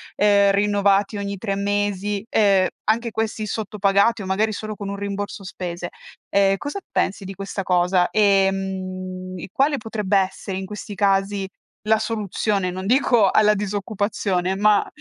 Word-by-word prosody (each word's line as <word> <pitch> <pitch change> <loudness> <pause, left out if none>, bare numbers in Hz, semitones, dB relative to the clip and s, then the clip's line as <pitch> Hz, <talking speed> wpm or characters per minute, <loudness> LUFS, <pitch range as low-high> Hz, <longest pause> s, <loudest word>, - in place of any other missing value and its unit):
ehm, 200 -1 +4
rinnovati 200 0 +2
ogni 200 0 -4
3 200 -1 -2
mesi, 205 0 -1
ehm, 195 -5 +4 0.2
anche 230 +2 +1
questi 220 -1 -3
sottopagati 210 +1 +1
o 190 - -6
magari 210 +3 +1
solo 215 0 -5
con 200 -1 -6
un 200 - -3
rimborso 200 0 -5
spese. 175 -1 -5 0.4
Ehm, 195 0 +3
cosa 290 - -5
pensi 195 0 -1
di 195 - -6
questa 195 +1 -5
cosa? 180 0 +2
Ehm, 190 -2 0
e 170 - -8
quale 280 +5 +2
potrebbe 210 -4 0
essere 190 0 -3
in 190 - -5
questi 210 +1 -7
casi, 195 0 +1 0.4
la 220 0 +5
soluzione? 210 -3 -1
Non 185 +1 -5
dico 235 -3 +4
alla 210 0 +4
disoccupazione, 200 -2 -1
ma 210 +1 +3
200 Hz, 150 wpm, -22 LUFS, 190-210 Hz, 0.4 s, la